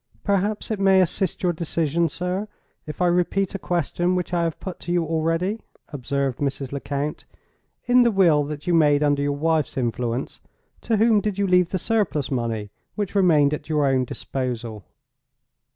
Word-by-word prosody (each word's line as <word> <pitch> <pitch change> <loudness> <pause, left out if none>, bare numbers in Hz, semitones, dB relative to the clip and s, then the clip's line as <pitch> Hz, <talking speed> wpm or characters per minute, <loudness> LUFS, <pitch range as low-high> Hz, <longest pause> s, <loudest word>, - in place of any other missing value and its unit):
"Perhaps 205 +2 0
it 215 - -2
may 195 -1 +5
assist 185 +1 0
your 175 -1 +2
decision, 165 0 0
sir, 180 +6 -3 0.4
if 150 +4 -3
I - - +4
repeat 180 +2 +1
a 195 - -4
question 175 +1 -1
which 180 0 -3
I 175 - +2
have 165 - -3
put 185 -2 -7
to 175 - -5
you 175 -1 +1
already," 165 +6 -1 0.3
observed 140 -2 -2
Mrs. 135 -2 -3
Lecount. 140 +1 -4 0.6
"In 250 0 +5
the 240 - +5
will 175 -8 +4
that 150 0 -7
you 175 - +1
made 150 -3 +4
under 145 -1 +2
your 145 0 -1
wife's 155 -2 0
influence, 120 0 -2 0.4
to 225 - 0
whom 220 -1 +4
did 205 -1 -2
you 200 - +1
leave 180 -2 +3
the 190 - -1
surplus 190 - -1
money 115 -5 -2 0.2
which 205 -2 -3
remained 155 -7 +4
at 150 - -6
your 150 -2 +2
own 135 -1 +2
disposal?" 120 -4 -5
165 Hz, 175 wpm, -23 LUFS, 140-185 Hz, 0.6 s, may